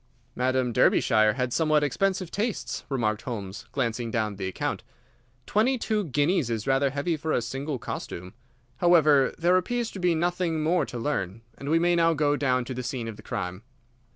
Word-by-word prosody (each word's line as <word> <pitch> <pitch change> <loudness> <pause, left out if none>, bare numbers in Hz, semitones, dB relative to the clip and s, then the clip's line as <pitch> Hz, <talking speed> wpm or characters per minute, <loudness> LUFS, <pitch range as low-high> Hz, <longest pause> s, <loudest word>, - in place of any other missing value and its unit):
"Madam 130 -1 +1
Derbyshire 110 -1 +4
had 125 -2 -2
somewhat 155 -2 +3
expensive 185 +5 0
tastes," 215 +1 -2
remarked 110 -6 0
Holmes, 100 -5 -6
glancing 120 -3 -1
down 110 -2 -1
the 95 -1 -3
account. 95 - -3 0.6
"Twenty 250 +5 +2
two 215 -3 -1
guineas 145 -1 +1
is 110 -2 -2
rather 135 +1 +2
heavy 145 +5 -1
for 155 +1 -3
a - - +2
single 135 +5 -4
costume. 90 -5 -6 0.4
However 155 -6 +5
there 175 +2 +4
appears 235 +5 -1
to 195 - -8
be 180 -2 +2
nothing 170 -1 0
more 165 -2 +2
to 125 - -6
learn, 115 -5 -2
and 140 - -6
we 160 - +4
may 175 +1 +3
now 165 -1 +3
go 145 -1 +2
down 130 -3 +1
to 130 - -5
the 125 - -4
scene 125 -1 -4
of 110 - -6
the - - -13
crime." 90 +2 -4
140 Hz, 180 wpm, -26 LUFS, 120-170 Hz, 0.6 s, However